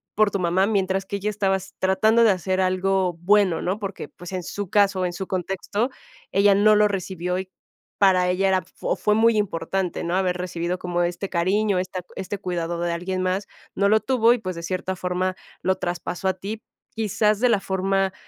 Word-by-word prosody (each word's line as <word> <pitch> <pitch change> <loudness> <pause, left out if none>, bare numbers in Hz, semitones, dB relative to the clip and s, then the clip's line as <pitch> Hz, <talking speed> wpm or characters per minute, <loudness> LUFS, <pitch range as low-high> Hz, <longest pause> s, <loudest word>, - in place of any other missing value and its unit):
por 210 -1 +3
tu 200 - -1
mamá 180 +2 +2
mientras 195 -2 0
que 200 - -4
ella 205 +2 -2
estaba 195 -2 +1
s 190 0 -11
tratando 215 +5 +3
de 220 - +6
hacer 185 +1 0
algo 185 0 +1
bueno, 190 -1 +3
¿no? 190 +4 -2
Porque, 200 -2 -5
pues, 175 +1 -11
en 185 -2 -3
su 200 +1 -5
caso, 195 -2 +3
en 175 - -2
su 190 +1 -5
contexto, 195 +5 -2 0.4
ella 200 0 +4
no 215 +1 +5
lo 210 0 +5
recibió 180 -2 -3
y, 190 0 -6 0.5
para 185 -2 +4
ella, 185 +2 +1
era 190 -1 +3
f 185 0 -16
fo - - -1
fue 210 - +1
muy 225 +1 +4
importante, 185 -1 -2
¿no?, 170 - -1
haber 185 -1 +1
recibido 175 0 -3
como 175 -1 -1
este 175 +3 -2
cariño, 190 +3 +1
esta 185 0 -4
este 200 +2 -4
cuidado 175 -3 -3
de 175 0 -1
alguien 185 +2 -3
más, 185 +2 -1 0.3
no 200 0 +2
lo 220 +1 +5
tuvo 240 -2 +3
y, 245 - -1
pues, 185 -5 -5
de 170 - -7
cierta 185 +1 -3
forma, 185 +1 -1 0.3
lo 190 0 +2
traspasó 175 +1 -3
a - - +1
ti, 210 +4 -6 0.3
quizás 215 -1 +1
de 250 +1 +3
la 215 - +3
forma, 195 0 0
190 Hz, 205 wpm, -23 LUFS, 180-205 Hz, 0.5 s, de